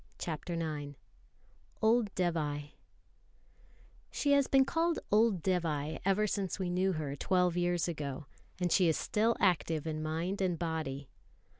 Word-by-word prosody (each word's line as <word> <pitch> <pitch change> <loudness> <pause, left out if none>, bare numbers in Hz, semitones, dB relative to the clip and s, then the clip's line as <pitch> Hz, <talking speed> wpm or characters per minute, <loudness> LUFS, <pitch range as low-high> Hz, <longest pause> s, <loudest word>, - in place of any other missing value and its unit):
CHAPTER 170 +1 -4
IX 150 -3 -4 0.8
Old 220 -1 +3
Dévai 150 -5 -1 1.4
SHE 285 - 0
has 280 -1 +4
been 270 -1 +5
called 330 +3 +1
"Old 210 -4 +3
Dévai" 160 -5 -1
ever 195 +2 +2
since 200 -2 -2
we 185 -3 -2
knew 185 +1 +1
her, 150 -4 -3
twelve 180 +3 +1
years 175 -1 +1
ago; 150 -4 -4 0.3
and 180 -1 0
she 180 - +4
is 160 - +2
still 225 +2 +1
active 165 -5 +1
in 155 -1 -3
mind 165 +6 -2
and 180 -3 +1
body. 160 -5 -3
175 Hz, 140 wpm, -32 LUFS, 155-195 Hz, 1.4 s, been